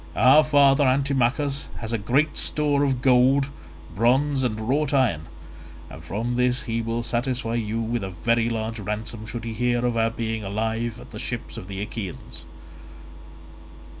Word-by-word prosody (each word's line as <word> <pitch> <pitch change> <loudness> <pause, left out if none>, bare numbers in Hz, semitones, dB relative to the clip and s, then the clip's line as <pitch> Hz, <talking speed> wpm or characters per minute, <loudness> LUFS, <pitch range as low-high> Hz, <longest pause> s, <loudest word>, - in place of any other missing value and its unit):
Our 130 +7 +6
father 145 -2 +4
Antimachus 135 +1 +1
has 115 0 -5
great 125 +8 +1
store 145 -2 +1
of 130 -3 0
gold, 135 +2 +4 0.5
bronze, 130 +5 +2
and 110 -4 -1
wrought 145 +2 +1
iron, 100 - +1 0.6
and 80 - -10
from 115 +8 -3
this 125 0 +1
he 115 -2 -2
will 115 +1 -2
satisfy 120 0 -2
you 115 -1 -2
with 115 -1 -2
a 95 - -4
very 115 +6 0
large 110 0 -3
ransom 110 +2 -5
should 115 +1 -6
he 115 -1 -4
hear 120 +1 0
of 120 -1 0
our 115 0 +2
being 110 -1 -3
alive 110 +3 -2
at - - -13
the - - -8
ships - - -5
of 90 - -8
the 100 0 -4
Achaeans." 105 -4 -7
120 Hz, 160 wpm, -24 LUFS, 110-130 Hz, 0.6 s, Our